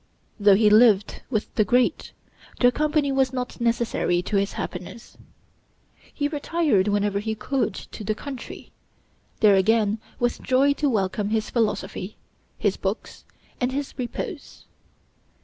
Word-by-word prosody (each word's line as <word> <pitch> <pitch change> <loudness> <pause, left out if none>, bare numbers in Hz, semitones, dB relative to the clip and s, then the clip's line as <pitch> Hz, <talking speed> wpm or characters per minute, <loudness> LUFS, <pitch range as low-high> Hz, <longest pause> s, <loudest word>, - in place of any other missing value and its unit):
Though 205 -1 +6
he 210 +2 +4
lived 215 -2 +4
with 215 -5 -2
the 215 - +3
great, 245 +3 +1 0.5
their 245 0 +5
company 300 +1 +1
was 265 -1 +2
not 250 -1 -5
necessary 230 -6 0
to 205 - -3
his 200 0 +1
happiness. 195 +6 -7 1.0
He 290 - -1
retired 295 - +1
whenever 205 -1 +1
he 220 +1 -3
could 260 +3 -1
to 215 - -9
the 215 +1 -1
country; 270 +1 -8 0.7
there 210 -2 +6
again 215 +2 +2 0.2
with 240 0 -1
joy 270 +2 +3
to 290 0 0
welcome 205 -2 -1
his 220 0 -1
philosophy, 210 -3 -2 0.4
his - - 0
books, - - -5 0.3
and 250 0 0
his 280 +1 -4
repose. 285 - -6
230 Hz, 135 wpm, -24 LUFS, 205-265 Hz, 1.0 s, Though